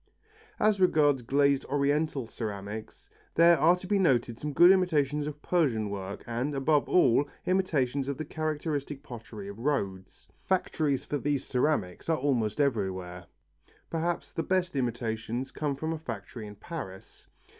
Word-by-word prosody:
As 215 -2 +3
regards 150 -7 +4
glazed 140 +2 +2
Oriental 145 -1 0
ceramics, 110 -1 -6 0.3
there 170 -1 +6
are 165 +5 +6
to 180 - -10
be 200 +1 +1
noted 120 -9 +2
some 150 - -3
good 175 +5 +7
imitations 150 -6 +2
of 150 0 -7
Persian 120 - +1
work 100 0 -5
and, 125 +5 -2
above 145 +2 +2
all, 145 -4 +4 0.2
imitations 145 -8 +1
of 140 -2 -2
the 155 - -4
characteristic 150 -2 -3
pottery 115 -5 -9
of 100 +2 -8
Rhodes. 100 -9 -3 0.2
Factories 155 -7 0
for 145 - -2
these 145 -1 -1
ceramics 125 - 0
are 160 - +3
almost 125 -6 0
everywhere. 95 -9 -1 0.6
Perhaps 170 +1 -2
the - - -1
best 185 -1 0
imitations 120 0 -2
come 145 -2 -2
from 160 +4 -3
a 160 - -5
factory 120 -7 -7
in 105 - -10
Paris. 100 - -9
140 Hz, 145 wpm, -29 LUFS, 115-155 Hz, 0.6 s, good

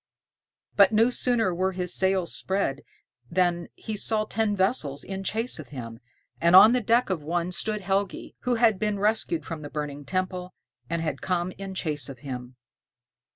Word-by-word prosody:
But 200 0 +6
no 225 +3 +4
sooner 235 -6 +1
were 190 +2 0
his 180 -1 -2
sails 190 -2 +1
spread 190 -8 -1 0.5
than 175 -1 +1
he 220 - -5
saw 215 +1 +1
ten 215 -1 0
vessels 175 - 0
in 195 0 -5
chase 225 +1 -1
of 140 -5 -9
him, 115 -5 -8 0.4
and 170 +2 +5
on 210 +5 +9
the 250 - +2
deck 230 0 +2
of 175 -5 -1
one 170 +3 -2
stood 210 +3 -2
Helgi, 195 +1 -2
who 250 -1 0
had 225 -4 +3
been 210 0 0
rescued 220 - 0
from 165 -2 -6
the 145 - -7
burning 145 -1 -5
temple, 185 +3 -3 0.3
and 170 0 -1
had 150 -4 -3
come 180 -1 -1
in 195 0 -7
chase 150 -6 +1
of 130 -3 -10
him. 125 -2 -7
185 Hz, 175 wpm, -26 LUFS, 160-210 Hz, 0.5 s, on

